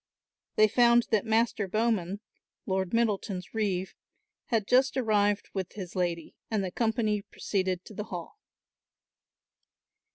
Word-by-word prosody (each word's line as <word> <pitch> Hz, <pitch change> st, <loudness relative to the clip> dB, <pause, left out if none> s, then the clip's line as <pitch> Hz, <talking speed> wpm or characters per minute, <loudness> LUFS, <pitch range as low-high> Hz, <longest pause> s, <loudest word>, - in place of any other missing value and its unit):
They 215 Hz, -, +6 dB
found 235 Hz, +2 st, +5 dB
that 220 Hz, 0 st, +2 dB
Master 220 Hz, -2 st, +2 dB
Bowman, 205 Hz, -2 st, 0 dB, 0.4 s
Lord 190 Hz, -2 st, -1 dB
Middleton's 205 Hz, -5 st, -1 dB
reeve, 195 Hz, -4 st, -1 dB, 0.5 s
had 225 Hz, -4 st, +1 dB
just 265 Hz, +2 st, +3 dB
arrived 205 Hz, -4 st, +2 dB
with 190 Hz, -2 st, -4 dB
his 185 Hz, -4 st, -7 dB
lady, 170 Hz, -3 st, -2 dB, 0.2 s
and 215 Hz, -3 st, 0 dB
the 185 Hz, -, -3 dB
company 220 Hz, -1 st, 0 dB
proceeded 185 Hz, -2 st, -2 dB
to -, -, -11 dB
the 210 Hz, +1 st, -5 dB
hall. 180 Hz, -, -7 dB
210 Hz, 125 wpm, -29 LUFS, 190-225 Hz, 0.5 s, They